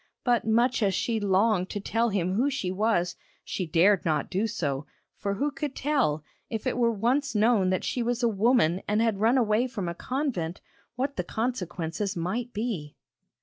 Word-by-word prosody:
But 240 -3 +2
much 235 +3 +3
as 195 -3 +2
she 225 +4 0
longed 195 -1 +2
to 205 - -3
tell 230 +3 0
him 185 -3 0
who 250 +8 +2
she 260 -10 -2
was, 185 -3 +1 0.3
she 185 - -3
dared 180 +4 +4
not 155 -3 0
do 200 +5 +1
so, 145 - -3 0.3
for 200 0 -2
who 285 +8 0
could 285 -1 -4
tell, 255 - +1 0.3
if 220 -2 -4
it - - 0
were 235 -1 +3
once 245 +6 0
known 210 -3 +3
that 185 - 0
she 250 - -1
was 240 +1 -1
a - - +5
woman 210 -4 +3
and 210 +1 +1
had 225 -3 +1
run 230 +5 +4
away 230 0 +2
from 210 -8 -4
a 170 - -2
convent, 210 - -3 0.4
what 270 +3 -2
the 180 - 0
consequences 190 -3 -3
might 225 +9 -2
be? 205 -10 -4
215 Hz, 190 wpm, -27 LUFS, 185-240 Hz, 0.4 s, a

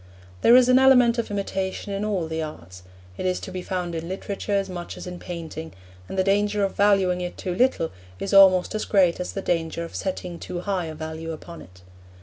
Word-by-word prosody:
There 235 - +7
is 250 -1 +7
an 255 0 +6
element 250 -3 +5
of 230 - -2
imitation 195 0 -3
in 195 +1 -2
all 195 -6 -1
the 160 0 -3
arts; 90 - -8 0.4
it - - -3
is 185 - 0
to - - -7
be 185 0 -4
found 180 -1 -3
in 165 0 -4
literature 200 +2 -4
as 195 -1 +1
much 175 -2 -7
as - - -8
in 180 -1 -7
painting, 160 -2 -7 0.4
and - - -5
the 190 - +3
danger 205 +1 +1
of 195 - 0
valuing 195 -3 +3
it 175 0 -5
too 180 - -3
little 195 -6 +1 0.3
is 195 - -3
almost 190 -1 +6
as 215 - -2
great 185 -4 +3
as 180 - -4
the 195 - -4
danger 165 -1 -1
of 165 - -8
setting 180 -2 -4
too 175 - -5
high 190 -3 -1
a 160 -1 -6
value 160 +1 -6
upon 170 +2 -10
it. 90 0 -16
185 Hz, 220 wpm, -24 LUFS, 170-200 Hz, 0.4 s, There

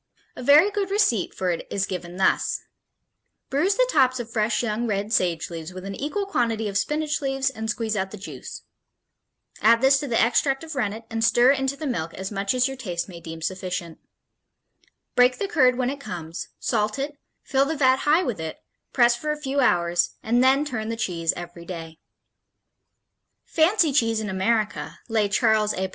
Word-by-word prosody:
A - - -8
very 295 +10 +6
good 405 -2 -2
receipt 390 - +1
for 185 -1 0
it 170 - -4
is 200 -1 0
given 180 -1 -6
thus: 190 - +1 0.9
Bruise 350 +9 +2
the - - +3
tops 255 -2 +3
of 235 -1 -6
fresh 220 +2 +1
young 235 +1 -1
red 205 +1 -2
sage 175 -4 0
leaves 165 +1 -7
with 185 0 -7
an 195 - -5
equal 305 - -3
quantity 230 - 0
of 200 - -5
spinach 300 +9 0
leaves 270 -1 0
and 220 -3 -5
squeeze 220 0 -1
out 190 -1 -1
the 210 - -9
juice. 200 - -9 1.0
Add 230 +1 +5
this 270 +1 +5
to 285 - -4
the 235 -3 +1
extract 270 +4 +2
of 320 -1 -7
rennet 225 -4 -2
and 225 0 -1
stir 240 +3 +5
into 270 0 0
the 305 - -6
milk 170 - -3
as 190 +2 -5
much 200 +3 -1
as 250 +1 +3
your 270 0 -6
taste 175 -9 -4
may 175 -3 -10
deem 165 -1 -8
sufficient. 180 -2 -4 1.2
Break 250 +1 +5
the 400 - -2
curd 255 -9 +3
when 255 0 0
it 280 - -7
comes, 170 -8 -6
salt 215 -1 -1
it, 285 +1 -4 0.2
fill 270 -1 +2
the 315 +2 -2
vat 260 -2 +4
high 310 +5 +3
with 240 - -3
it, 160 -1 -5 0.4
press 240 -1 +5
for 300 +5 -3
a 300 - -2
few 280 -1 -2
hours, 175 -8 +2
and 240 +3 +2
then 270 +3 +4
turn 225 -6 -4
the 230 - -2
cheese 170 -6 0
every 175 -1 -8
day. 165 -2 -8 1.5
Fancy 330 -1 +3
Cheese 230 -5 +2
in 215 -1 -4
America, 210 +3 -1
lay 215 -2 +1
Charles 215 0 +2
A. 190 0 -2
230 Hz, 190 wpm, -24 LUFS, 190-270 Hz, 1.5 s, very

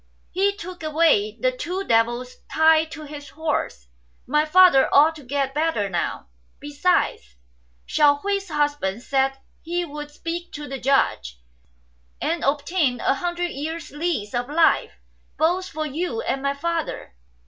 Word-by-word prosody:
He 400 +2 +1
took 365 -3 -8
away> 305 -10 +2
the - - +2
two 390 -6 -4
devils 240 -1 0
tied 315 0 +4
to 310 0 -8
his 290 -1 -9
horse. 285 - -3 0.4
My 300 +4 +2
father 350 -3 +6
ought 310 +3 +5
to 295 - -12
gfet 270 +1 -2
better 300 -10 0
now. 175 - -3 0.3
Besides, 290 - 0 0.5
Hsiao 290 -1 +4
hui's 400 -1 -1
husband 290 -8 -1
said 270 0 +1 0.2
he 345 +2 -2
would 295 -1 -7
speak 335 +3 -6
to 295 0 -6
the 270 0 -5
Judge, 65 - +1 0.8
and 335 +1 -1
obtain 285 -2 +1
a - - +2
hundred 350 +3 -2
years' 320 +4 -5
lease 295 -9 -2
of 245 +2 -2
life 325 +2 +3 0.4
both 355 +4 +1
for 310 +1 -4
you 345 +9 -3
and 270 - -2
my 280 0 -1
father." 330 - -3
300 Hz, 145 wpm, -23 LUFS, 270-340 Hz, 0.8 s, father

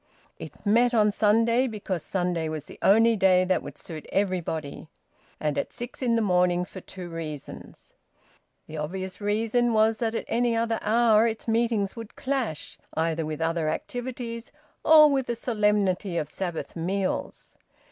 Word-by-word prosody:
It - - -11
met 240 +4 +3
on 210 -2 +4
Sunday 230 +5 +3
because 200 -6 -4
Sunday 175 -3 -1
was 155 -2 -5
the - - -13
only 225 +3 +5
day 185 -2 +4
that 185 0 +1
would - - -9
suit 160 -3 -8
everybody; 165 -6 -2 0.5
and 150 -2 -1
at - - -3
six 240 +2 -7
in 240 -3 +2
the 230 - +2
morning 180 -2 +2
for 185 - -10
two 180 0 -9
reasons. 160 -4 -8 0.7
The 155 - -8
obvious 185 +6 -5
reason 225 +3 +1
was 220 0 +3
that 230 -1 -1
at - - -3
any 235 0 +1
other 230 0 0
hour 225 0 +4
its 225 0 -4
meetings 225 -3 +1
would 225 -2 -9
clash 255 - -3 0.2
either 160 0 0
with 155 0 -5
other 165 -1 0
activities 240 +4 -5 0.3
or 310 -1 +8
with 270 -2 0
the 235 - -1
solemnity 210 -5 0
of 150 - -1
Sabbath 175 -2 -5
meals. 185 +3 -3
205 Hz, 155 wpm, -26 LUFS, 175-230 Hz, 0.7 s, or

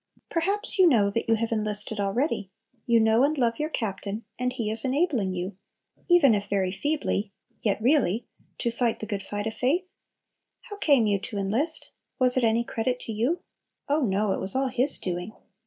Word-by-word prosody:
Perhaps 395 +5 0
you 370 - +7
know 205 -7 +3
that 230 +2 -2
you 225 - +5
have 230 +1 -2
enlisted 215 -1 -1
already, 205 - -1 0.4
you 235 -1 +4
know 220 +2 +4
and 300 +2 +1
love 235 -3 +1
your 305 +1 -1
Captain, 210 -3 -4
and 250 0 0
He 220 -3 -3
is 220 0 -1
enabling 260 - 0
you, 180 +2 -5 0.5
even 330 -9 +6
if 200 -1 -2
very 190 -2 0
feebly, 215 -3 -1 0.3
yet 205 -3 0
really, 235 - +2 0.3
to 235 - -1
fight 235 -1 0
the - - -4
good 205 -2 -3
fight 205 +2 -5
of 220 - -2
faith? 300 +11 0 0.8
How 415 -4 -10
came 280 - +3
you 200 -2 +1
to 205 - -5
enlist? 230 - 0 0.3
Was 255 -1 +3
it 255 - +1
any 230 +1 +2
credit 245 +2 -2
to - - -6
you? 250 +12 -1 0.5
Oh 295 +2 +1
no! 205 -3 +1
it - - -1
was 190 +4 +1
all 265 0 +1
His 255 +4 +5
doing. 180 +3 -4
230 Hz, 190 wpm, -26 LUFS, 205-270 Hz, 0.8 s, you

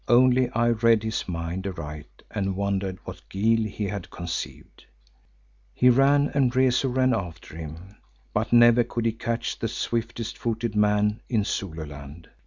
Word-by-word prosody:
Only 125 +1 +5
I 120 -1 +1
read 115 -1 +3
his 110 -3 -3
mind 85 +3 -3
aright 75 -5 -8
and 95 -1 -2
wondered 95 -1 -1
what - - -9
guile 110 +3 +2
he 105 +1 -5
had 100 -2 -5
conceived. 85 -1 -6 0.9
He 125 0 +5
ran, 140 +3 +4
and 135 -4 +3
Rezu 130 0 +3
ran 130 0 +2
after 85 -4 -5
him, 80 +5 -9 0.4
but 110 +2 -1
never 120 0 +6
could 120 0 -4
he 115 - +3
catch 115 +1 -3
the 115 - -1
swiftest 115 +1 -3
footed 115 -1 -2
man 105 0 +2
in 110 -4 +2
Zululand. 80 -4 -6
110 Hz, 150 wpm, -25 LUFS, 95-120 Hz, 0.9 s, never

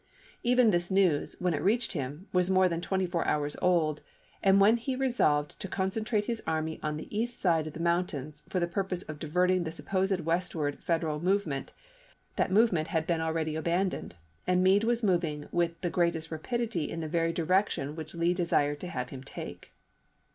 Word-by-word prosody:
Even 245 -2 +4
this 175 -1 0
news, 190 -6 +2
when 180 -1 +1
it 150 - -1
reached 235 +4 +2
him, 145 +3 -4
was 180 0 +3
more 185 0 +5
than 170 -1 -2
twenty 190 +1 0
four 175 -1 -1
hours 145 -1 0
old, 165 -4 +2 0.4
and 195 0 +5
when 210 +4 +6
he 255 +3 -3
resolved 195 - +1
to - - -4
concentrate 205 +3 -1
his 230 -1 -2
army 160 0 -1
on 150 0 -2
the - - -6
east 240 +3 -2
side 165 -4 +2
of 155 - -7
the - - -8
moun 170 +1 +2
tains 150 +1 -7
for 185 - 0
the 175 - +2
purpose 185 0 -2
of 155 -1 -8
diverting 180 +4 +2
the 160 - -4
supposed 190 +2 0
westward 165 -3 -1
Federal 160 -3 0
movement, 175 -6 0 0.6
that - - +1
movement 190 -6 +3
had 160 -1 -1
been 165 -1 0
already 160 -1 -1
abandoned, 170 - -1 0.3
and 180 0 +3
Meade 195 +3 +4
was 235 0 +1
moving 170 -7 0
with 170 -1 0
the 175 - -1
greatest 170 -2 0
rapidity 200 0 -2
in 165 - -4
the 160 - -3
very 165 +1 +1
direction 170 -3 0
which 160 0 -7
Lee 170 +1 +2
desired 145 -5 +1
to 180 - -6
have 125 -7 -4
him 130 - -8
take. 135 - -8
175 Hz, 190 wpm, -29 LUFS, 155-190 Hz, 0.6 s, when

